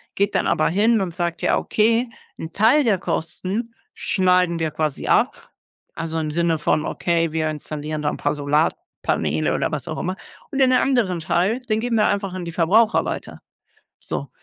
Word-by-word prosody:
geht 200 +1 0
dann - - +2
aber 155 - +2
hin 215 +5 +3
und 180 -3 -3
sagt: 170 -1 -2
„Ja, - - +2
okay, 230 +3 +2 0.3
'n 160 +1 -7
Teil 230 +8 +4
der 210 -7 +2
Kosten 185 +7 -3 0.2
schneiden 180 -2 +2
wir 160 -1 0
quasi 155 -3 -2
ab“, - - +1 0.5
also 165 -1 -3
im 155 -1 -2
Sinne 165 0 +1
von: 150 0 +1
„Okay, 165 -1 0
wir 155 0 0
installieren 150 0 -5
da 145 - +2
'n - - -6
paar - - -1
Solarpaneele”, 140 - 0
oder - - -1
was - - -4
auch - - -4
immer, 185 +2 -2 0.4
„und 275 - -2
den 260 -1 +5
anderen 245 -9 +2
Teil, 185 +9 0
den 220 -3 -1
geben 235 0 -1
wir 215 - +4
einfach 200 -2 -1
an 185 -1 -5
die 170 - -5
Verbraucher 210 +7 +3
weiter.” - - -5 0.6
So, - - -5
180 Hz, 185 wpm, -22 LUFS, 160-220 Hz, 0.6 s, den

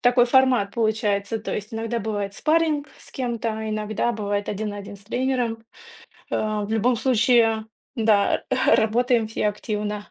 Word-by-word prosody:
такой 245 0 +5
формат 250 -5 +3
получается. 220 -1 0
То 220 - -4
есть 210 +2 -6
иногда 225 +1 -2
бывает 205 -2 -3
спарринг 310 +1 +1
с - - -16
кем-то, 230 -3 -3
иногда 215 +2 -1
бывает 205 -1 -2
один 210 +1 -3
на 205 - -7
один 200 0 -9
с 200 - -20
тренером. 245 -1 -1 0.7
Э, 215 -1 -1
в 205 - -7
любом 230 +3 +2
случае 230 -2 +3 0.3
да, 215 -3 +2 0.2
работаем 235 +1 +3
все 215 -1 -1
активно. 210 0 -4
220 Hz, 150 wpm, -23 LUFS, 210-240 Hz, 0.7 s, такой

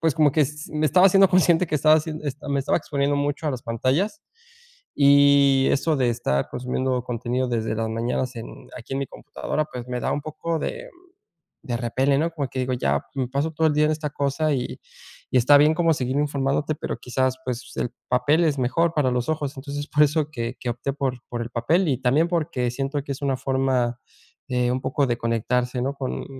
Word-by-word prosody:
pues 160 -3 +1
como 150 0 +4
que 155 - +3
s 150 +2 -5
me 155 0 +1
estaba 180 +4 +6
haciendo 195 0 +6
consciente 180 -1 +4
que 155 - -3
estaba 155 +1 +5
hacien 155 0 -3
este, 145 0 -5
me 140 -1 +1
estaba 135 - +1
exponiendo 145 -2 -1
mucho 145 +2 -2
a - - +1
las 125 -3 -5
pantallas 135 - -1 0.7
y 140 -1 +5
eso 155 +2 +1
de 125 -3 +2
estar 70 - -1
consumiendo 125 0 -2
contenido 125 +1 -2
desde 110 -2 -1
las 110 0 -1
mañanas 120 +2 -2
en 115 - -9
aquí 120 - -10
en 135 - -1
mi 140 - -2
computadora, 150 +1 -4
pues 125 -4 -8
me 125 0 -2
da - - -1
un - - -1
poco 160 +2 -3
de, - - -5 0.5
mm, - - -24
de 120 -2 -1
repele, 130 +4 +1
¿no?, 165 +2 0
como 145 -4 -3
que 130 - -5
digo 130 0 -1
ya, 70 - 0
jum, 135 -2 -1
me - - -3
paso 140 +5 -1
todo 160 +1 +2
el 150 - +2
día 150 +1 +3
en 155 - +2
esta 155 -1 -2
cosa 145 +2 0
y 125 -3 -3 0.5
y 130 - +5
está 135 +4 +6
bien 150 +2 +5
como 165 -1 +3
seguir 130 -1 -2
informándote, 145 +1 0
pero - - -4
quizás, 130 +1 -1
pues, 125 -1 -5
el 120 - -1 0.2
papel 145 +7 +3
es 150 -3 +1
mejor 165 +7 +1
para 140 -4 +1
los 125 +3 -1
ojos. 150 -2 -2
Entonces, 145 +2 -5
por 150 0 +4
eso 150 0 +1
que 120 -2 -4
que 125 - -3
opté 125 +3 -3
por 135 -3 -2
por 120 -1 -4
el 120 - -5
papel 160 +11 +1
y 130 - +1
también 140 +7 +3
porque 150 -8 -1
siento 135 +3 -2
que 140 - -4
es 135 - -10
una 135 -2 0
forma, 130 -3 0 0.5
eh, 125 -1 +1
un 130 +1 -1
poco 135 +2 0
de 120 -1 0
conectarse, 125 +2 -1
¿no?, 135 +3 -1
con 135 -2 -4
140 Hz, 225 wpm, -24 LUFS, 125-150 Hz, 0.7 s, estaba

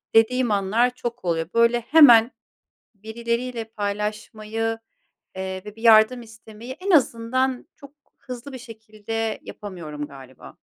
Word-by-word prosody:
dediğim 240 +2 +3
anlar 205 +5 +2
çok 240 -3 -6
oluyor, 165 -2 -1
böyle, 235 +1 +3
hemen 240 -3 +7 0.6
birileriyle 235 +3 -4
paylaşmayı, 215 +1 -4 0.6
eee, 190 0 -5
ve 210 0 -10
bir 225 - -14
yardım 225 +2 +6
istemeyi, 225 +1 -12
en 380 +8 -3
azından 255 -2 +1
çok 280 0 -15 0.3
hızlı 255 +2 -9
bir - - -6
şekilde, 220 -1 -5
yapamıyorum 160 -8 -8
galiba. 130 -2 -14
225 Hz, 120 wpm, -23 LUFS, 210-240 Hz, 0.6 s, hemen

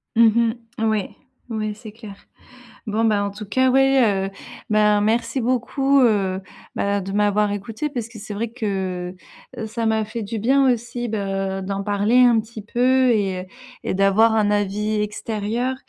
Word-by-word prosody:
Mmh 230 +1 +6
mh. 230 +1 +3 0.3
Ouais, 215 -3 -1 0.4
ouais, 215 -1 -2
c'est 215 0 -11
clair. 215 -2 -11 0.7
Bon 215 +2 0
ben, 210 -2 +2
en 200 - -2
tout 210 +1 -8
cas, 260 +6 +2
ouais, 260 -8 +3
heu, - - -5 0.4
ben 210 -1 +4
merci 230 +5 0
beaucoup, 265 +3 +2
heu, 195 -5 +2 0.3
bah 200 0 0
de 195 +1 -6
m'avoir 210 0 +2
écouté. 220 +8 -4
Parce 240 -5 -5
que 230 - -11
c'est 210 0 -7
vrai 220 +2 -3
que, 190 -5 -3 0.4
heu, 225 - -4
ça 225 +1 -3
m'a 220 0 +2
fait 220 +1 -5
du 220 +2 -4
bien 265 +4 +4
aussi 240 +1 -5
de 195 -2 -2
d'en 195 +1 -3
parler 205 +3 +1
un 240 -2 +6
petit 220 0 -10
peu 250 +3 +2
et 190 -4 -1 0.4
et - - -2
d'avoir 195 +4 +4
un 210 -1 +2
avis 210 +1 0
extérieur 220 +4 -2
215 Hz, 170 wpm, -22 LUFS, 200-235 Hz, 0.7 s, Mmh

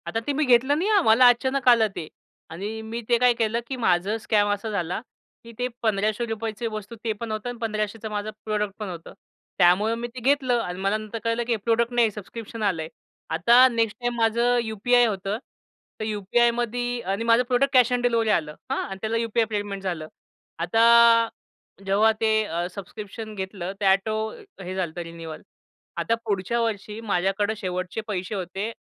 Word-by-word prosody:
आता 225 - -1
ते 290 - +1
मी 300 +2 +1
घेतलं 255 +3 +4
नाही 370 +6 0
हा 415 -2 +5
मला 245 -3 +6
अचानक 260 +2 0
आलं 230 -2 +6
ते. 155 - -5 0.4
आणि 205 +7 -5
मी 225 +2 -5
ते 240 - +5
काय 250 +1 +4
केलं, 230 0 0
की 265 - -3
माझं 195 -1 +1
स्कॅम 210 -2 +1
असा 205 +2 -4
झाला, 180 -4 -2 0.4
की 230 - -11
ते 250 - 0
₹1,500 220 +1 -1
वस्तू 215 0 -6
ते 225 - 0
पण 230 -2 -5
होतं 215 +3 -3
आणि 245 - -6
1,500चं 215 -1 -3
माझं 210 0 -3 0.2
प्रॉडक्ट 210 -2 -1
पण 210 -2 -4
होतं 170 -2 -9 0.4
त्यामुळं 190 +5 +4
मी 240 +1 -4
ते - - -5
घेतलं 255 -1 +2
आणि 180 -2 -5
मला 195 +2 +1
नंतर 215 +1 -6
कळलं, 230 +1 0
की 240 - -4
हे - - 0
प्रॉडक्ट 230 +3 +1
नाही 235 -2 +3
सबस्क्रिप्शन 220 +2 -8
आलंय. 165 -6 0 0.4
आता 235 +11 +6
नेक्स्ट 225 -2 0
टाईम 240 0 -1
माझं 235 +2 +2
यू-पी-आय 240 +3 +3
होतं 200 -1 -2 0.6
तर 215 - -2
यू-पी-आयमध्ये 240 +3 0
आणि 195 +2 -2
माझं 230 +1 +4
प्रॉडक्ट 270 +2 +2
कॅश 250 -2 +5
ऑन 245 - +1
डिलिव्हरी 230 -2 +2
आलं 155 -7 0 0.2
हां. - - 0
आणि 195 - -6
त्याला 225 +1 -1
यू-पी-आय 230 0 +1
पेमेंट 205 -2 -3
झालं. 170 -5 -3 0.5
आता 230 +5 +5 0.6
जेव्हा 205 +3 +4
ते 220 -1 +3
अ, 170 -2 -2
सबस्क्रिप्शन 210 +3 -8
घेतलं 190 -2 -5
ते - - 0
ऑटो 195 +3 +3 0.5
हे 185 +1 -5
झालं 180 -4 -2
तर 175 - -4
रिन्यूवल. 165 -1 -9 0.6
आता 230 - +1
पुढच्या 205 +2 -1
वर्षी 215 -1 -3
माझ्याकडं 200 0 0
शेवटचे 185 0 -3
पैसे 195 0 -3
होते 195 +3 -4
220 Hz, 180 wpm, -24 LUFS, 195-235 Hz, 0.6 s, मला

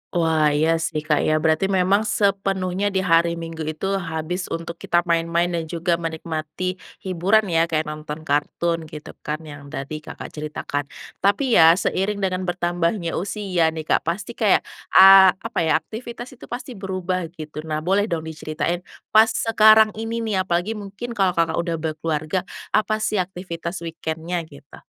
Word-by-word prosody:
Wah, 160 -2 +3
iya 160 +2 +2
sih 160 -2 -2
Kak, 150 -1 +2
ya, 155 - +3
berarti 160 +4 +2
memang 195 +2 +2
sepenuhnya 195 -2 0
di 190 - +2
hari 170 0 +3
Minggu 165 -2 -6
itu, 195 +5 -2
habis 170 +2 -4
untuk 170 0 -5
kita 175 0 +1
main-main, 170 0 +1
dan 165 -2 -2
juga 170 +1 -1
menikmati 165 +2 -4 0.2
hiburan, 190 +4 +2
ya? 165 0 +3
Kayak 155 -2 -1
nonton 150 0 -7
kartun, 160 +3 -1
gitu 150 -1 -9
kan, 155 +2 -4
yang 145 -2 -10
tadi 145 +1 -5
Kakak 150 - -9
ceritakan. 150 -1 -4 0.3
Tapi, 225 +4 +3
ya, 165 +1 +8
seiring 195 +2 -1
dengan 185 -1 -1
bertambahnya 175 0 -1
usia 190 -3 0
nih, 160 0 -3
Kak, - - +2
pasti 195 +7 -2
kayak, 215 -4 +2 0.3
a 190 -1 +9
apa - - -4
ya, 160 -3 +2
aktivitas 235 - -5
itu - - -11
pasti 245 +1 -6
berubah, 185 -4 -3
gitu. 155 -1 -7
Nah, 155 0 -2
boleh 195 +4 +2
dong 170 -6 -2
diceritain 160 +2 -3 0.3
pas 220 +1 +7
sekarang 220 -1 +5
ini 230 +1 -3
nih, 220 -3 -1
apalagi, 175 +4 0
mungkin 210 +2 -6
kalau 195 -5 +1
Kakak 165 0 +1
udah 170 -1 -1
berkeluarga, 155 +1 -2 0.3
apa 215 0 +2
sih 215 -2 0
aktivitas 175 -1 -5
weekend-nya, 165 +1 -4
gitu? 140 -2 -15
170 Hz, 160 wpm, -22 LUFS, 160-195 Hz, 0.3 s, a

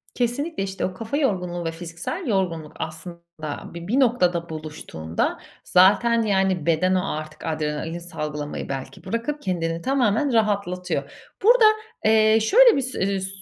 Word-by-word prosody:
Kesinlikle, 250 +2 -1
işte. 195 0 -3
O 185 - -3
kafa 225 +8 -4
yorgunluğu 180 - -1
ve 165 - -1
fiziksel 170 - -6
yorgunluk 170 -7 -1
aslında 160 -1 -7
bi 170 +1 -8
bir 255 +6 +2
noktada 180 -10 +2
buluştuğunda 150 - -4 0.3
zaten, 205 +6 +4
yani, 190 -5 +1
beden 185 +3 +2
o 185 +1 0
artık 155 0 -8
adrenalin 155 +1 -3
salgılamayı 150 -5 -5
belki 135 -1 -6
bırakıp 260 +6 -3
kendini 165 -3 -2
tamamen 260 0 +1
rahatlatıyor. 200 -5 0 0.3
Burada, 470 +1 +6 0.4
eee, 220 0 +5
şöyle 465 - +6
bis 260 -1 -1
eee, 195 0 0
s 190 - -3
185 Hz, 140 wpm, -23 LUFS, 165-230 Hz, 0.4 s, Burada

